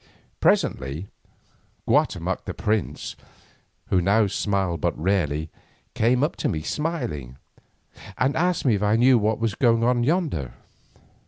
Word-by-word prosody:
Presently 70 +7 +1 0.8
Guatemoc - - +1
the - - -5
prince, 105 -4 -2 0.7
who 90 - +3
now 100 +4 +3
smiled 100 -4 -1
but - - 0
rarely, 80 -4 0 0.4
came 125 +4 +2
up 155 - 0
to - - -1
me 80 -1 -3
smiling, 120 - -3 0.8
and 135 +3 +1
asked 175 0 0
me 125 - +4
if 100 - 0
I 105 +1 +3
knew 125 +1 +5
what 105 +1 +1
was 115 -2 -1
doing 120 +1 +2
yonder. 145 - -1
105 Hz, 130 wpm, -24 LUFS, 85-125 Hz, 0.8 s, knew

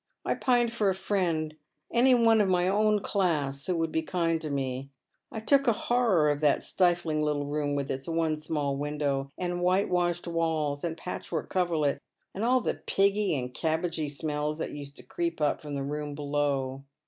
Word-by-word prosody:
I - - +2
pined 240 -2 +2
for 210 -4 +2
a 190 - 0
friend, 170 -6 -1 0.4
any 250 +2 +5
one 225 -2 +5
of 200 - +2
my 180 -1 +3
ewn 210 +1 +2
class 150 -8 0
who 180 - +1
would 165 -1 -1
be 160 - +1
kind 165 0 0
to 155 - -4
me. 135 -1 -3 0.4
I 220 - -4
took 275 +4 +3
a 235 - +5
hon 240 +3 0
or 160 -6 +4
of 145 0 0
that 150 -2 +3
stifling 175 -4 +1
little 150 -1 0
room 145 0 -1
with 140 -1 -2
its 135 +3 -4
one 165 -1 +1
small 150 -2 -2
window, 140 -1 -1
and 175 -1 -2
whitewashed 180 -1 +1
walls, 160 -4 -1
and 165 -1 -2
patchwork 170 -3 -5
coverlet, 160 -6 +1 0.3
and 200 - -3
all 255 +2 +3
the - - -2
piggy 200 -3 +2
and 125 -1 -4
cabbagy 160 -1 -1
smells 150 +1 -2
that - - -3
used 145 -1 -8
to - - -12
creep 170 -1 -3
up 150 -1 +1
fi 150 - -9
om 145 - -3
the 140 - -2
room 145 +1 -4
below. 140 -2 -1
160 Hz, 195 wpm, -28 LUFS, 145-185 Hz, 0.4 s, any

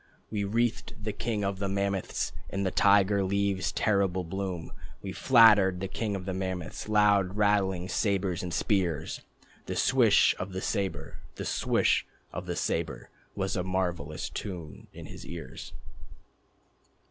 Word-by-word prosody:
We 105 -2 -1
wreathed 115 +1 -1
the 105 -1 -2
king 110 -3 -2
of 100 -1 -2
the 100 -1 -1
mammoths 100 -1 -1 0.2
In 100 0 -2
the 95 - 0
tiger 100 +1 +4
leaves' 100 -1 0
terrible 95 -3 +1
bloom. 90 -1 -4 0.3
We 95 - -4
flattered 105 -7 +6
the 95 - -3
king 105 +1 -3
of 95 -2 -5
the 95 - -2
mammoths, 95 0 -4
Loud 100 -2 +3
rattling 95 -3 +2
sabres 95 -3 0
and 90 - -5
spears. 85 -4 0 0.5
The - - -3
swish - - +4
of 95 +1 -5
the 95 - -3
sabre, 100 -5 -3 0.2
The - - -5
swish - - +1 0.3
of - - -5
the - - -2
sabre, - - -2 0.2
Was 95 -1 -1
a 90 - 0
marvellous 90 -5 -2
tune 85 -8 -7
in - - -10
his - - -10
ears. 85 -1 -8
95 Hz, 145 wpm, -29 LUFS, 90-100 Hz, 0.5 s, flattered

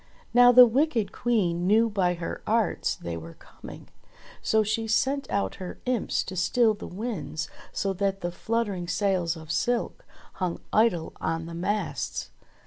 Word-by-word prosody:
Now 245 0 +8
the 250 0 +10
wicked 245 -2 +1
Queen 180 -7 0
knew 220 +3 +5
by 190 -5 +1
her 170 -1 -5
arts 220 -2 +1
they 85 -1 -6
were 80 0 -9
coming, - - -12 0.5
so 220 0 +2
she 225 +2 -1
sent 270 +5 +1
out 200 - -1
her 180 - -6
imps 250 -4 0
to 185 - -7
still 220 +5 +3
the 210 - -8
winds 200 -6 -4 0.2
so 195 -1 -1
that 195 0 -1
the 175 - -2
fluttering 200 -2 -2
sails 180 -2 0
of 160 -1 -8
silk 240 +8 -1 0.4
hung 180 -2 -1
idle 215 -7 +2
on 165 0 -2
the 170 - -8
masts. 200 +5 -3
200 Hz, 155 wpm, -26 LUFS, 175-230 Hz, 0.5 s, the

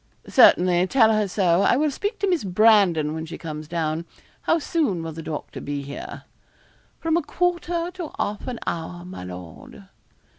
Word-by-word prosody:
'Certainly; 180 0 +5
tell 225 -1 +4
her 215 -1 +1
so. 180 -2 +2
I 240 - +4
will 300 +1 +1
speak 410 - -3
to 400 - +2
Miss 355 -4 +1
Brandon 190 -6 +4
when 160 0 -5
she 165 - -7
comes 155 -2 -7
down. 160 0 -2 0.4
How 330 - +2
soon 290 - -1
will 165 - -5
the 160 +1 -7
doctor 155 -1 -6
be 145 0 -4
here?' 140 +1 -8 0.8
'From 325 0 +1
a - - +1
quarter 345 +2 -1
to 350 -4 -6
half 205 0 -3
an 250 -2 -3
hour, 175 +1 -4
my 180 - -8
lord.' 90 -3 -10
185 Hz, 175 wpm, -23 LUFS, -, 0.8 s, Certainly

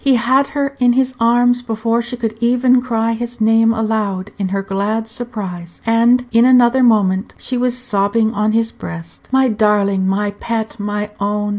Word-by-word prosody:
He 275 -2 +4
had 260 +4 +2
her 280 0 -1
in 245 -1 +4
his 260 0 +1
arms 245 +1 +3
before 230 0 -1
she 240 +1 -5
could 225 -2 -3
even 250 +1 +3
cry 230 -2 -1
his 240 +1 -5
name 225 +1 +3
aloud 215 -3 -2
in 195 - -1
her 195 +1 -2
glad 205 +3 -2
surprise, 205 -8 -6
and 235 +2 +3
in 230 +1 +4
another 250 0 +4
moment 205 -5 +2
she 255 - -4
was 250 0 0
sobbing 220 -1 0
on 210 +1 0
his 225 +1 0
breast. 85 -1 -10
"My 265 0 +3
darling! 205 -3 +1
my 205 +2 0
pet! 220 +2 -5
my 210 0 -3
own!" 205 +1 -1
225 Hz, 175 wpm, -17 LUFS, 205-245 Hz, -, He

